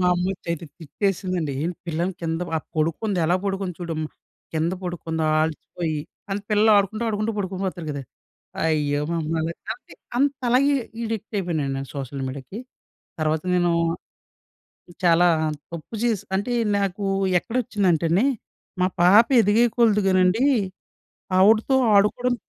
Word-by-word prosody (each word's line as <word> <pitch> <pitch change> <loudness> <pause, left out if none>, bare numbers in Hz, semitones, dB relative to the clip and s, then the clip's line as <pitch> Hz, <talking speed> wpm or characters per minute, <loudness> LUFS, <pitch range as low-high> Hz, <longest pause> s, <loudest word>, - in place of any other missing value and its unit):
మా 180 - +2
అమ్మొచ్చియితే 175 -2 -3
తిట్టేసిందండి, 180 -1 -2
"ఏంటి 170 +1 -2
పిల్లను 170 +3 -1
కింద 165 0 -2 0.2
ఆహ్, 155 - -4
పడుకుంది 165 +6 0
ఎలా 175 +3 +3
పడుకుంది 195 -2 -2
చూడమ్మా 160 -3 -3 0.5
కింద 160 +2 0
పడుకుందా 160 -2 -2 0.2
అలిసిపోయి" 160 0 -3 0.3
అంటే 195 +1 -2
పిల్లలు 215 +1 +4
ఆడుకుంటూ, 205 +3 +1
ఆడుకుంటూ 215 +1 -1
పడుకొని 190 -1 -3
పోతారు 175 -3 -5
కదా! 140 - -5 0.6
అయ్యో! 150 -2 +1
మామ్మ 165 -1 -1 0.3
కాపోతే - - -7 0.2
అంతలాగా 270 0 +2
అడి 230 -2 -6
అడిక్ట్ 220 -1 -5
అయిపోయానండి 150 -7 -2
సోషల్ 135 -1 -5
మీడియాకి. 135 - -7 0.6
తర్వాత 155 0 +1
నేను 175 -1 +2 1.3
చాలా 175 0 +5 0.5
తప్పు 170 +7 -7
చేసి 220 -5 +1
అంటే 205 +6 -1 0.3
నాకు 200 0 -2 0.4
ఎక్కడోచ్చిందంటండీ 190 - +1 0.6
మా 185 - +4
పాప 200 +6 +7 0.2
ఎదిగేయకొలదు 220 0 +3
కానండీ, 185 +7 +3 0.9
ఆవిడతో 220 +7 +5 0.2
ఆడుకోవడం 245 +5 +3
180 Hz, 115 wpm, -23 LUFS, 160-210 Hz, 1.3 s, పాప